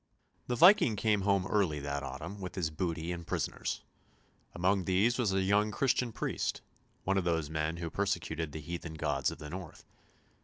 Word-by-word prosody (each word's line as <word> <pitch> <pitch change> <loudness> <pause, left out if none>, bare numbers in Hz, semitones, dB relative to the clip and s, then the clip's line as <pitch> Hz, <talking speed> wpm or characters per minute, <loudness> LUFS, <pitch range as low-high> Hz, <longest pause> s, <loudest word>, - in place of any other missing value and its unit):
The 125 - 0
Viking 170 - +7
came 105 0 +2
home 100 -1 +2
early 95 -7 +1
that 70 0 -3
autumn 90 +8 -6
with 90 - -6
his 85 -4 -1
booty 85 +1 -2
and 85 -1 -6
prisoners; - - -2 0.7
among 95 +1 +2
these 105 +7 +2
was 110 -6 +2
a 95 0 +2
young 105 +2 +3
Christian 125 +2 +1
priest, - - -2 0.4
one 95 +1 +2
of - - -2
those 80 -3 0
men 80 +1 -1
who 85 -1 -4
persecuted 85 -6 -1
the 80 - -6
heathen 85 +1 -6
gods 75 -4 0
of - - -7
the 75 -1 -8
north. 90 -3 -8
90 Hz, 180 wpm, -32 LUFS, 80-100 Hz, 0.7 s, Viking